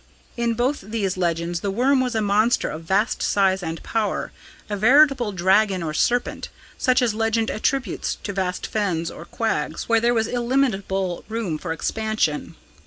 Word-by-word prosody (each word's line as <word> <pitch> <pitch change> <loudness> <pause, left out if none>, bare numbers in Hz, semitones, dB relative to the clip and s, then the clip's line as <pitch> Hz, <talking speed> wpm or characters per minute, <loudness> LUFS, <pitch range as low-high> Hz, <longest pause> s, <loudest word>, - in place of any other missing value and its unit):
In 235 -1 0
both 255 +5 0
these 200 -2 -2
legends 170 -1 -1
the 200 - -2
'worm' 255 +7 +2
was 250 -2 -1
a 220 - +1
monster 210 +4 +2
of 155 - -6
vast 200 +6 +1
size 190 -1 +2
and 165 -1 -5
power 220 -2 -2 0.4
a 210 - -2
veritable 255 +1 +4
dragon 190 0 +2
or 155 -2 -3
serpent, 245 +9 0 0.3
such 255 0 +2
as 230 -3 +1
legend 225 +1 0
attributes 240 -1 -1
to 200 - -4
vast 185 -2 -2
fens 175 -6 -1
or - - -10
quags - - -2
where 230 -1 +2
there 240 +1 +2
was 225 -1 +2
illimitable 215 -8 0
room 215 -9 -2
for 165 - -5
expansion. 190 -3 -1
215 Hz, 165 wpm, -23 LUFS, 185-235 Hz, 0.4 s, veritable